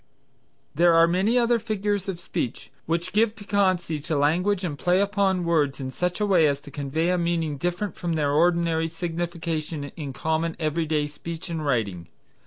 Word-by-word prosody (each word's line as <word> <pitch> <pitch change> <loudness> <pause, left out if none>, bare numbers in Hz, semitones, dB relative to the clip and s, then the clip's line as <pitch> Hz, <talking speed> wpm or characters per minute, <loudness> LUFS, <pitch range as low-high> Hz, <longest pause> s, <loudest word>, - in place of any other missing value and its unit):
There 170 +2 +4
are 165 0 +7
many 190 +8 +2
other 240 -1 +3
figures 205 -3 -2
of 180 -3 -4
speech 125 - -4 0.2
which 165 +1 -1
give 215 +1 +3
piquancy 185 -6 0
to 155 +1 -2
language 180 +7 +2
and 160 -5 -2
play 180 +5 +2
upon 200 -3 +1
words 150 -5 +1
in 130 -1 -4
such 180 +6 -2
a 210 - +2
way 180 -6 +4
as 140 -1 0
to 145 - -12
convey 150 +5 -1
a 180 - +1
meaning 170 -3 0
different 175 +4 -2
from 170 -1 -2
their 150 -3 +1
ordinary 165 +1 +2
signification 165 -3 -4
in 145 -4 -5
common 160 +4 -1
every 160 0 -1
day 150 -1 +1
speech 165 +4 -7
and 160 -2 -3
writing. 100 - -1
170 Hz, 180 wpm, -25 LUFS, 155-180 Hz, 0.2 s, are